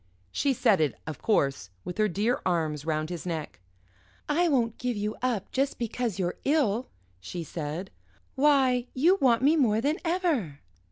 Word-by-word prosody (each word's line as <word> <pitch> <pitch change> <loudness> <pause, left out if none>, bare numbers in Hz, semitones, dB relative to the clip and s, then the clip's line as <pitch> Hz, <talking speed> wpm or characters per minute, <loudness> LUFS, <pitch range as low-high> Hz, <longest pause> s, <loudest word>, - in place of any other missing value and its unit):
She 280 - +1
said 205 -7 +3
it, 150 - +1
of 160 -1 -7
course, 135 - +1 0.2
with 180 +4 -6
her 215 - +4
dear 210 +6 0
arms 155 -5 -1
round 155 +1 -1
his 175 -3 -5
neck. 165 -4 -5 0.7
"I 335 +4 +2
won't 235 -6 +1
give 250 -3 -2
you 210 +1 -2
up 240 -6 -1
just 275 +1 0
because 235 -2 -2
you're 180 -2 -2
ill," 260 -5 +1 0.3
she 170 - -6
said; 160 +3 -5 0.4
"why, 265 -3 +3
you 345 +9 +4
want 245 -2 +4
me 295 +4 +5
more 225 -8 +3
than 290 +7 0
ever!" 325 - -1
220 Hz, 165 wpm, -27 LUFS, 170-270 Hz, 0.7 s, me